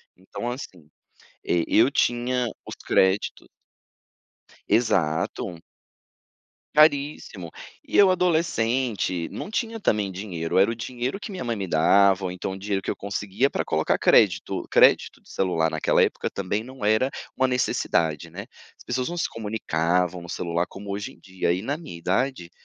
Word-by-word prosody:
então 95 Hz, +6 st, -6 dB
assim, 90 Hz, -, -8 dB, 0.6 s
eh, 85 Hz, -1 st, +1 dB
eu 120 Hz, +5 st, +4 dB
tinha 125 Hz, -1 st, +1 dB, 0.2 s
os -, -, -6 dB
créditos. 95 Hz, +2 st, +1 dB, 1.2 s
Exato. 85 Hz, -5 st, 0 dB, 1.2 s
Caríssimo, 140 Hz, -, +2 dB, 0.3 s
e -, -, -4 dB
eu 200 Hz, -2 st, +7 dB
adolescente 125 Hz, -, 0 dB
não 205 Hz, -, -6 dB
tinha 225 Hz, -1 st, -2 dB
também 105 Hz, -, 0 dB
dinheiro, 90 Hz, -3 st, -2 dB
era 100 Hz, +4 st, +5 dB
o -, -, -2 dB
dinheiro 125 Hz, -, -4 dB
que 210 Hz, -, -8 dB
minha 185 Hz, -, -5 dB
mãe 120 Hz, -2 st, -2 dB
me 100 Hz, -, -3 dB
dava, 95 Hz, +4 st, +4 dB
ou 90 Hz, -, -2 dB
então 90 Hz, +1 st, -4 dB
o 95 Hz, -, -7 dB
dinheiro 100 Hz, -1 st, -2 dB
que -, -, -3 dB
eu -, -, -3 dB
conseguia 100 Hz, +5 st, -1 dB
pra -, -, -2 dB
colocar 80 Hz, 0 st, 0 dB
crédito, -, -, +3 dB
crédito -, -, +4 dB
de -, -, -20 dB
celular 80 Hz, -4 st, 0 dB
naquela 80 Hz, -, +2 dB
época -, -, 0 dB
também 100 Hz, +3 st, -2 dB
não 130 Hz, -2 st, -9 dB
era 110 Hz, +5 st, +3 dB, 0.2 s
uma 130 Hz, -, +2 dB
necessidade, 80 Hz, -, 0 dB
né, -, -, -7 dB, 0.3 s
as -, -, -17 dB
pessoas 125 Hz, +3 st, -2 dB
não 175 Hz, -, -5 dB
se 170 Hz, -, 0 dB
comunicavam 90 Hz, -5 st, -1 dB
no 85 Hz, -, -11 dB
celular, 85 Hz, 0 st, -2 dB
como 100 Hz, 0 st, -9 dB
hoje 100 Hz, +1 st, -4 dB
em -, -, -22 dB
dia 95 Hz, -2 st, -2 dB
e 95 Hz, -, -4 dB
na 145 Hz, +6 st, -2 dB
minha 155 Hz, -, -9 dB
idade, 95 Hz, +1 st, -1 dB
100 Hz, 160 wpm, -24 LUFS, 90-125 Hz, 1.2 s, eu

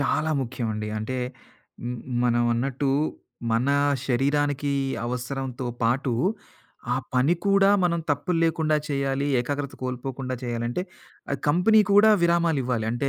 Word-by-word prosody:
చాలా 155 Hz, +3 st, +1 dB
ముఖ్యమండి. 110 Hz, -4 st, -3 dB
అంటే 125 Hz, +4 st, -3 dB, 0.7 s
మ్మా 125 Hz, 0 st, -5 dB
మనం 120 Hz, -1 st, +2 dB
అన్నట్టు 135 Hz, +3 st, -1 dB, 0.6 s
మన 120 Hz, +4 st, +1 dB, 0.4 s
శరీరానికి 145 Hz, +2 st, +1 dB, 0.3 s
అవసరంతో 125 Hz, +1 st, -4 dB, 0.2 s
పాటు, 125 Hz, +2 st, +1 dB, 0.8 s
ఆ -, -, 0 dB, 0.2 s
పని 135 Hz, +7 st, +3 dB
కూడా 195 Hz, 0 st, +5 dB
మనం 170 Hz, -1 st, +1 dB
తప్పులు 170 Hz, +3 st, 0 dB
లేకుండా 160 Hz, -2 st, +1 dB
చేయాలి, 140 Hz, 0 st, -1 dB
ఏకాగ్రత 140 Hz, +2 st, -3 dB
కోల్పోకుండా 130 Hz, +1 st, -4 dB
చేయాలంటే, 120 Hz, +6 st, -2 dB, 0.7 s
కంపెనీ 185 Hz, +8 st, +5 dB
కూడా 210 Hz, +2 st, +7 dB
విరామాలివ్వాలి 150 Hz, -9 st, +1 dB
అంటే 130 Hz, +3 st, -1 dB
135 Hz, 110 wpm, -25 LUFS, 125-155 Hz, 0.8 s, కూడా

